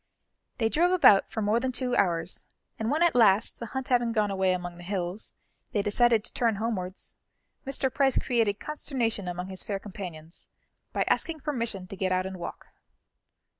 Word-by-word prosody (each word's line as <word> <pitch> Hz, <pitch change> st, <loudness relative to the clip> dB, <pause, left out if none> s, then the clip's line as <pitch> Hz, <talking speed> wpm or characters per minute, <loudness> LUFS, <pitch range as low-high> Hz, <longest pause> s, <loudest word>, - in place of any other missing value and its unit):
They 225 Hz, -, +2 dB
drove 335 Hz, +10 st, +3 dB
about 275 Hz, -, +6 dB
for 220 Hz, -, -3 dB
more 210 Hz, +3 st, +2 dB
than 260 Hz, +1 st, -1 dB
two 250 Hz, 0 st, -1 dB
hours, 170 Hz, -4 st, 0 dB, 0.3 s
and 220 Hz, 0 st, -1 dB
when 305 Hz, +5 st, +2 dB
at 345 Hz, -, +4 dB
last, 220 Hz, -3 st, +4 dB
the 235 Hz, -, -5 dB
hunt 265 Hz, +3 st, -5 dB
having 240 Hz, -2 st, +2 dB
gone 210 Hz, -3 st, +1 dB
away 190 Hz, -1 st, +2 dB
among 175 Hz, -1 st, -3 dB
the -, -, -10 dB
hills, 185 Hz, +1 st, -3 dB, 0.4 s
they 205 Hz, -3 st, +1 dB
decided 225 Hz, +1 st, +3 dB
to -, -, -6 dB
turn 230 Hz, -3 st, +1 dB
homewards, 195 Hz, -4 st, -4 dB, 0.5 s
Mr. 265 Hz, -1 st, 0 dB
Price 270 Hz, -2 st, +2 dB
created 225 Hz, -5 st, +1 dB
consternation 240 Hz, -9 st, -2 dB
among 180 Hz, +1 st, -4 dB
his 190 Hz, -1 st, -6 dB
fair 200 Hz, -, -2 dB
companions 180 Hz, -5 st, -9 dB, 0.4 s
by -, -, +1 dB
asking 320 Hz, -3 st, 0 dB
permission 235 Hz, -10 st, -3 dB
to 190 Hz, -, -8 dB
get 185 Hz, -1 st, -1 dB
out 185 Hz, 0 st, +1 dB
and 190 Hz, 0 st, -5 dB
walk. -, -, -7 dB
215 Hz, 180 wpm, -28 LUFS, 185-245 Hz, 0.5 s, about